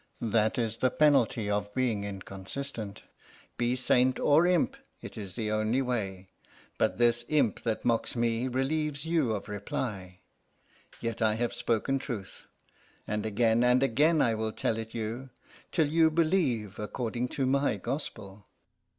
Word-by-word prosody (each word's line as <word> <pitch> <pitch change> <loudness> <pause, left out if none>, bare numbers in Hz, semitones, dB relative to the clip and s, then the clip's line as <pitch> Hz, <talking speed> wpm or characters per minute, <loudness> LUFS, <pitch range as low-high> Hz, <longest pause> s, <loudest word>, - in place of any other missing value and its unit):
That 110 -1 +1
is 115 -2 -1
the 130 - +2
penalty 125 -7 +3
of 105 0 -2
being 115 -6 0
inconsistent. 100 +3 -6 0.5
Be 120 +1 0
saint 125 0 +2
or 155 +4 +5
imp; 180 -2 +2 0.2
it - - -9
is 100 -4 -7
the 110 -2 -2
only 110 +5 +1
way. 95 -7 -3 0.5
But - - +1
this 120 0 +3
imp 145 -8 +2
that 115 -2 -2
mocks 115 0 +1
me 115 +1 0
relieves 145 +3 -1
you 160 -8 +1
of 105 -1 -4
reply. 100 -3 -5 0.8
Yet 115 -1 -4
I 110 -1 +3
have 120 +1 -1
spoken 125 +4 0
truth, 115 -8 -7 0.6
and 105 +1 -2
again 115 +2 +2
and 125 +2 +4
again 150 +5 +3
I 115 - +2
will 110 0 -2
tell 115 - -1
it 110 +1 -7
you, 115 +4 -4 0.4
till 160 -4 +3
you 160 +1 +4
believe 155 - +1
according 120 +3 -3
to 135 - +1
my 140 +2 +2
gospel." 100 -8 -6
115 Hz, 150 wpm, -29 LUFS, 105-135 Hz, 0.8 s, or